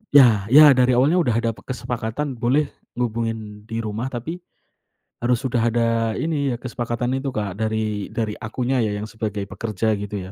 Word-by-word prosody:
Ya 115 Hz, -8 st, +7 dB
ya, 145 Hz, +4 st, +9 dB
dari 125 Hz, -1 st, +4 dB
awalnya 145 Hz, +8 st, +4 dB
udah 120 Hz, -9 st, +2 dB
ada 115 Hz, 0 st, +1 dB
pe 110 Hz, -, -14 dB
kesepakatan 125 Hz, +1 st, -3 dB
boleh 135 Hz, +5 st, +1 dB, 0.2 s
ngehubungin 115 Hz, -3 st, -3 dB
di 115 Hz, 0 st, -3 dB
rumah, 110 Hz, +3 st, -3 dB
tapi 135 Hz, +8 st, -5 dB, 0.8 s
harus 120 Hz, 0 st, +1 dB
udah 130 Hz, -2 st, -1 dB, 0.2 s
ada 120 Hz, -1 st, +2 dB, 0.4 s
ini 145 Hz, -5 st, 0 dB
ya, -, -, -3 dB
kesepakatan 120 Hz, +1 st, -2 dB
itu 135 Hz, -1 st, -3 dB
Kak 100 Hz, -6 st, -3 dB
dari 110 Hz, -2 st, -2 dB
dari 110 Hz, -2 st, -2 dB
akunya 125 Hz, +4 st, -2 dB
ya 110 Hz, -4 st, +1 dB
yang 105 Hz, +1 st, -4 dB
sebagai 110 Hz, -3 st, -4 dB
pekerja 110 Hz, -1 st, -1 dB
gitu 100 Hz, -2 st, -5 dB
ya. -, -, -10 dB
115 Hz, 175 wpm, -22 LUFS, 110-130 Hz, 0.8 s, ya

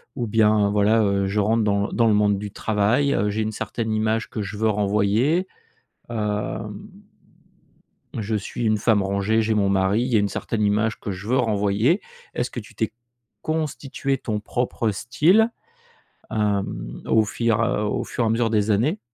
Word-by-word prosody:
ou 120 Hz, -, -2 dB
bien, 105 Hz, -2 st, +3 dB
voilà, 105 Hz, +2 st, +3 dB
heu, 100 Hz, -1 st, +1 dB
je 105 Hz, +2 st, 0 dB
rentre 110 Hz, +1 st, +2 dB
dans 100 Hz, 0 st, +1 dB
dans 115 Hz, -2 st, +2 dB
le 110 Hz, -, +4 dB
monde 105 Hz, -1 st, +3 dB
du 105 Hz, 0 st, -5 dB
travail, 110 Hz, +7 st, +1 dB
heu, 105 Hz, +2 st, +1 dB
j'ai 110 Hz, +2 st, -1 dB
une 110 Hz, 0 st, -1 dB
certaine 110 Hz, +1 st, -4 dB
image 110 Hz, +1 st, 0 dB
que 110 Hz, -, -4 dB
je 100 Hz, +1 st, -5 dB
veux 110 Hz, +1 st, +1 dB
renvoyer, 105 Hz, -, +1 dB, 0.6 s
hem. 105 Hz, -2 st, -2 dB, 1.5 s
Je 110 Hz, +1 st, -2 dB
suis 105 Hz, +3 st, -3 dB
une 110 Hz, -1 st, +2 dB
femme 105 Hz, -1 st, +3 dB
rangée, 100 Hz, +3 st, +1 dB
j'ai 110 Hz, 0 st, 0 dB
mon 100 Hz, -2 st, +2 dB
mari, 100 Hz, +3 st, +2 dB
il 125 Hz, -, -1 dB
y 120 Hz, -, +2 dB
a -, -, +5 dB
une 100 Hz, 0 st, +1 dB
certaine 110 Hz, +1 st, -3 dB
image 105 Hz, +2 st, +1 dB
que 100 Hz, -, -5 dB
je 100 Hz, +4 st, -8 dB
veux 130 Hz, +2 st, +2 dB
renvoyer»? 110 Hz, -, +2 dB, 0.3 s
Est-ce 120 Hz, -, -2 dB
que -, -, -7 dB
tu 105 Hz, -, -15 dB
t'es 110 Hz, -, -2 dB, 0.5 s
constitué 145 Hz, -3 st, -2 dB
ton 105 Hz, -4 st, -3 dB
propre 120 Hz, 0 st, -1 dB
style, 160 Hz, -, +2 dB, 0.8 s
hem, 100 Hz, -, -2 dB
au 110 Hz, -1 st, +4 dB
fur 115 Hz, +1 st, 0 dB
au 105 Hz, -2 st, 0 dB
fur 120 Hz, -, -2 dB
et -, -, +1 dB
à -, -, +1 dB
mesure 115 Hz, 0 st, +1 dB
des 110 Hz, -1 st, +2 dB
années? 135 Hz, -, +1 dB
110 Hz, 180 wpm, -23 LUFS, 105-115 Hz, 1.5 s, a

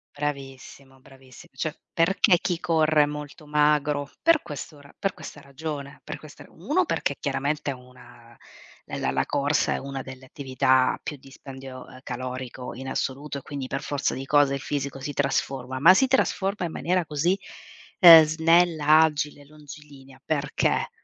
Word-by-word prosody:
Bravissimo, 135 Hz, -2 st, -6 dB
bravissi 135 Hz, +4 st, -17 dB
cioè, 155 Hz, -1 st, -4 dB, 0.2 s
perché 180 Hz, +2 st, +3 dB
chi 175 Hz, -2 st, -2 dB
corre 160 Hz, -3 st, +3 dB
è -, -, +5 dB
molto 150 Hz, +1 st, -8 dB
magro? 150 Hz, -1 st, +1 dB
Per 330 Hz, -2 st, +4 dB
questo 145 Hz, +1 st, -8 dB
ra 140 Hz, 0 st, -17 dB
per 195 Hz, -1 st, -2 dB
questa 150 Hz, -, -10 dB
ragione, 140 Hz, 0 st, -7 dB
per -, -, -7 dB
questa -, -, -13 dB
ra -, -, -20 dB
1, -, -, 0 dB
perché -, -, -1 dB
chiaramente 145 Hz, 0 st, -2 dB
una 125 Hz, 0 st, -15 dB, 0.5 s
la 65 Hz, -, -3 dB
la 65 Hz, 0 st, 0 dB
corsa 145 Hz, +1 st, +1 dB
è -, -, -1 dB
una 135 Hz, -1 st, -6 dB
delle 130 Hz, 0 st, -11 dB
attività 130 Hz, -2 st, +1 dB
a -, -, -8 dB
più 150 Hz, -, -6 dB
dispendio, 135 Hz, -1 st, -11 dB
ehm, 130 Hz, -, -13 dB
calorico 125 Hz, -1 st, -6 dB
in 130 Hz, +1 st, -7 dB
assoluto, 140 Hz, +2 st, -3 dB
e -, -, -15 dB
quindi 140 Hz, -1 st, -6 dB
per 135 Hz, +2 st, -4 dB
forza 145 Hz, -1 st, -2 dB
di 135 Hz, +1 st, -6 dB
cose 145 Hz, -2 st, +4 dB
il 140 Hz, -, -2 dB
fisico 140 Hz, -1 st, -4 dB
si 145 Hz, +2 st, -5 dB
trasforma, 135 Hz, -2 st, -2 dB
ma 170 Hz, +7 st, +7 dB
si 265 Hz, -, +4 dB
trasforma 200 Hz, -7 st, 0 dB
in -, -, -8 dB
maniera 180 Hz, -1 st, -1 dB
così, 155 Hz, +5 st, +1 dB, 0.6 s
ehm, 165 Hz, -3 st, +11 dB
snella, 160 Hz, -1 st, +4 dB
agile, 150 Hz, -2 st, 0 dB
longilinea. 145 Hz, -2 st, -14 dB
Perché? 145 Hz, -2 st, 0 dB
145 Hz, 165 wpm, -25 LUFS, 135-155 Hz, 0.6 s, ehm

